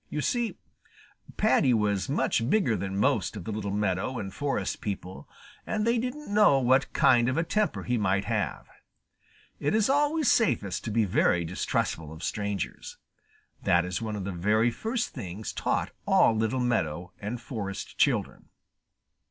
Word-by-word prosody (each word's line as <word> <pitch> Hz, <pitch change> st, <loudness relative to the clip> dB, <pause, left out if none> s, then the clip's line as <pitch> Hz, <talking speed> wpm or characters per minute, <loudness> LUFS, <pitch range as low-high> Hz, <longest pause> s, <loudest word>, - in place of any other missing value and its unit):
You 150 Hz, -, -3 dB
see, 240 Hz, -, -1 dB, 0.8 s
Paddy 150 Hz, -, +3 dB
was 105 Hz, -1 st, 0 dB
much 125 Hz, -4 st, +1 dB
bigger 185 Hz, -, +2 dB
than 95 Hz, -1 st, -3 dB
most 105 Hz, 0 st, +1 dB
of 95 Hz, -, -7 dB
the 110 Hz, -, -5 dB
little 105 Hz, -1 st, -3 dB
meadow 100 Hz, +4 st, -1 dB
and 95 Hz, -3 st, -5 dB
forest 135 Hz, -9 st, -2 dB
people, 95 Hz, -2 st, -6 dB, 0.3 s
and 215 Hz, 0 st, -1 dB
they 235 Hz, 0 st, +2 dB
didn't 250 Hz, -1 st, -5 dB
know 205 Hz, -9 st, +6 dB
what 130 Hz, +1 st, +3 dB
kind 120 Hz, -1 st, +4 dB
of 130 Hz, -, -1 dB
a 165 Hz, -, +2 dB
temper 210 Hz, +5 st, -1 dB
he 125 Hz, -1 st, 0 dB
might 100 Hz, -1 st, +1 dB
have. 110 Hz, -6 st, -2 dB, 0.9 s
It 145 Hz, -, 0 dB
is 220 Hz, +3 st, +3 dB
always 295 Hz, +1 st, +2 dB
safest 105 Hz, -, +2 dB
to -, -, -2 dB
be 110 Hz, 0 st, +2 dB
very 90 Hz, -2 st, +2 dB
distrustful 80 Hz, -1 st, -2 dB
of 80 Hz, +1 st, -10 dB
strangers. 100 Hz, -4 st, -4 dB, 0.6 s
That 85 Hz, 0 st, +3 dB
is 90 Hz, +4 st, -3 dB
one 110 Hz, -2 st, -3 dB
of 100 Hz, -, -4 dB
the 100 Hz, -, -3 dB
very 105 Hz, +6 st, +2 dB
first 225 Hz, -, -2 dB
things 105 Hz, -3 st, -6 dB
taught -, -, -1 dB, 0.2 s
all 115 Hz, -, +5 dB
little 110 Hz, +4 st, 0 dB
meadow 90 Hz, -8 st, -1 dB
and 110 Hz, +4 st, -4 dB
forest 100 Hz, -7 st, -6 dB
children. -, -, +1 dB
110 Hz, 160 wpm, -28 LUFS, 100-145 Hz, 0.9 s, know